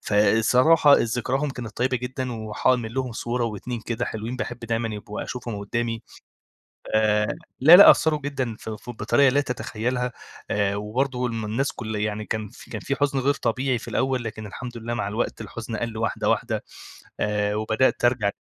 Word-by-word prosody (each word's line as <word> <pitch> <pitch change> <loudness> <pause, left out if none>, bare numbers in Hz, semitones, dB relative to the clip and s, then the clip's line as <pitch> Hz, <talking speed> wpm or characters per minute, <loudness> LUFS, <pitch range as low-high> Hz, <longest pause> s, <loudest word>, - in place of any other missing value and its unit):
فالصراحة 125 +9 +5
ذكراهم 125 +5 -1
كانت 120 -5 -8
طيبة 130 +2 +1
جدًا 125 +1 -4
وحاعمل 115 +1 0
لهم 130 -2 -2
صورة 120 +1 -2
و2 115 +2 -4
كده 120 +1 -3
حلوين، 115 +3 -4
باحب 120 -1 -4
دايمًا 115 -1 -2
يبقوا 105 0 -6
أشوفهم 120 -4 -5
قدامي. 115 +3 -2 0.9
آآ، 105 -1 +3 0.3
لأ، 160 +7 +10
لأ، 200 - +11
أثروا 155 -1 +3
جدًا 130 -6 -2
في 110 -1 -6
ف 120 - -8
بطريقة 135 +4 +3
لا 140 - +3
تتخيلها، 125 -1 -2 0.4
آآ، 100 -1 +1
وبرضو 125 +5 -1
الم 115 -2 -3
الناس 115 +7 -1
كل 110 -2 -5
يعني 105 0 -2
كان 110 -1 -3
في - - -15
كان 110 - -5
في 140 - -2
حزن 140 -1 +1
غير 140 +2 +2
طبيعي 130 0 0
في - - -10
الأول 130 -2 0
لكن 110 -1 -6
الحمد 120 +4 -7
لله 120 +1 -4
مع 120 -4 -2
الوقت 110 +3 -2
الحزن 110 +1 -6
قَل 115 0 -4
واحدة، 110 0 -1
واحدة - - -1 0.6
آآ، 105 -1 0
وبدأت 110 +4 +1
أرجع 120 -5 +3
تاني - - -23
120 Hz, 175 wpm, -24 LUFS, 110-130 Hz, 0.9 s, لأ